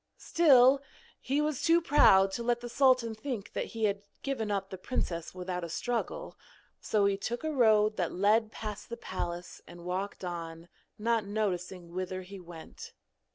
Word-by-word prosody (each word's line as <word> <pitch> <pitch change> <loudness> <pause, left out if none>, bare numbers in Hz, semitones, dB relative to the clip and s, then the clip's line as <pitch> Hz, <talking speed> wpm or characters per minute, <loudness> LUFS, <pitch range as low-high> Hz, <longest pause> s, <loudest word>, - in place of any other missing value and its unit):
Still, 275 -5 +5 0.4
he 280 +3 0
was 300 -2 -1
too 335 +1 +5
proud 195 - +5
to 235 - -4
let 240 0 0
the 240 - -6
sultan 255 -3 +3
think 220 -2 -5
that - - -2
he 225 -1 -6
had 200 -1 +1 0.2
given 260 -6 -2
up 195 -1 -2
the 190 - -5
princess 170 -6 -3
without 180 -1 -4
a 170 - -5
struggle, 245 - -3 0.4
so 210 -2 +1
he 200 0 +2
took 240 +6 -4
a 315 - -1
road 215 -5 +4
that 175 -3 0
led 215 +4 +2
past 210 -1 -7
the 235 - -5
palace 175 -4 -5
and 175 0 -12
walked 190 +2 -3
on, 165 -1 -6 0.3
not 225 0 +1
noticing 185 -4 -3
whither 185 0 -4
he 195 +1 -10
went. 170 -2 -11
210 Hz, 170 wpm, -30 LUFS, 185-240 Hz, 0.4 s, Still